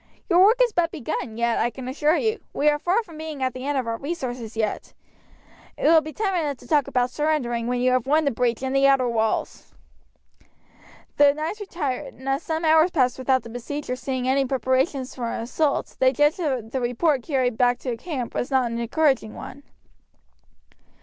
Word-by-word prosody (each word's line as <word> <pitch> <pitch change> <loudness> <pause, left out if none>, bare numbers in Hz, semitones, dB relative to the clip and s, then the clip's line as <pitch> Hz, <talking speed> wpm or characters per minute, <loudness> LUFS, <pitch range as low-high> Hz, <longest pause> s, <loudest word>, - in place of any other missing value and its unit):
Your 350 +2 +6
work 440 +5 +5
is 475 -3 0
but 340 -1 +2
begun 235 -6 -4
yet, 235 0 +1
I 240 - +2
can 255 +1 -9
assure 300 +5 +1
you. 440 0 0
We 300 - +3
are 295 0 0
far 375 +9 +1
from 330 -6 -13
being 310 -4 -5
at 255 -1 0
the 255 +2 -6
end 290 -1 0
of 260 - -1
our 230 0 -2
resources 250 -7 -5
yet. 215 -2 -3 0.8
It - - -7
will 320 +1 +6
be 310 0 -7
time 405 +2 -1
enough 300 -6 -1
to - - -16
talk 295 -4 +2
about 250 0 0
surrendering 250 -7 -1
when 245 0 -1
you 255 0 +3
have 255 0 +1
won 310 +2 +3
the 280 - +2
breach 240 0 -1
and 265 0 -2
the 275 0 +5
outer 270 -2 +3
walls." 225 -2 -2 1.4
The 285 0 +6
knights 315 +8 -4
retired; 320 -10 -4
and 265 - -12
as 270 +2 0
some 320 0 -3
hours 315 +2 +5
passed 260 -7 +1
without 260 0 +1
the 230 - -10
besiegers 250 +2 -5
seeing 260 -2 -3
any 270 +1 +3
preparation 260 +1 0
for 250 -2 -6
an 230 - -3
assault 280 +5 -1
they 260 0 +5
judged 295 +4 +2
that 260 -9 -2
the 265 - -2
report 255 +4 +1
carried 255 -3 0
back 245 +1 +2
to 250 -3 -3
camp 255 -2 -5
was - - -2
not 260 -4 +1
an 230 - -3
encouraging 255 -2 +1
one. 280 - -9
265 Hz, 205 wpm, -24 LUFS, 245-310 Hz, 1.4 s, Your